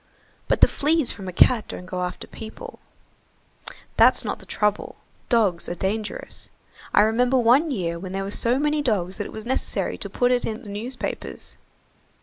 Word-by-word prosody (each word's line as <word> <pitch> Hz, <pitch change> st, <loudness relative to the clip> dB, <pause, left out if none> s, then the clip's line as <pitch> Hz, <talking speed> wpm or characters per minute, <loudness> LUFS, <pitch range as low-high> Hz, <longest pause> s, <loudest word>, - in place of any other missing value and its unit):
"But -, -, +1 dB
the -, -, +9 dB
fleas 305 Hz, -1 st, +1 dB
from 195 Hz, -2 st, -8 dB
a -, -, -3 dB
cat 225 Hz, +5 st, +4 dB
don't 180 Hz, -, -7 dB
go 180 Hz, 0 st, -3 dB
after 180 Hz, -, -5 dB
people." 220 Hz, -1 st, -10 dB, 1.2 s
"That's -, -, +5 dB
not -, -, -3 dB
the -, -, -14 dB
trouble, 210 Hz, -1 st, -1 dB, 0.3 s
dogs 210 Hz, -8 st, +2 dB
are 175 Hz, -, -3 dB
dangerous. 210 Hz, +4 st, -4 dB, 0.4 s
I -, -, +6 dB
remember 245 Hz, +4 st, +3 dB
one 255 Hz, +7 st, +4 dB
year 170 Hz, -, -2 dB
when 185 Hz, +1 st, -7 dB
there 195 Hz, +1 st, -2 dB
were 195 Hz, -, -5 dB
so 235 Hz, +4 st, +2 dB
many 300 Hz, +1 st, +1 dB
dogs 195 Hz, -8 st, -1 dB
that 205 Hz, -, -3 dB
it -, -, -11 dB
was 220 Hz, 0 st, -8 dB
necessary 260 Hz, +2 st, -1 dB
to -, -, -5 dB
put 245 Hz, 0 st, +1 dB
it 250 Hz, -1 st, +2 dB
in 220 Hz, +2 st, -4 dB
the 210 Hz, -, -9 dB
newspapers. 235 Hz, +5 st, -6 dB
220 Hz, 180 wpm, -24 LUFS, 190-250 Hz, 1.2 s, the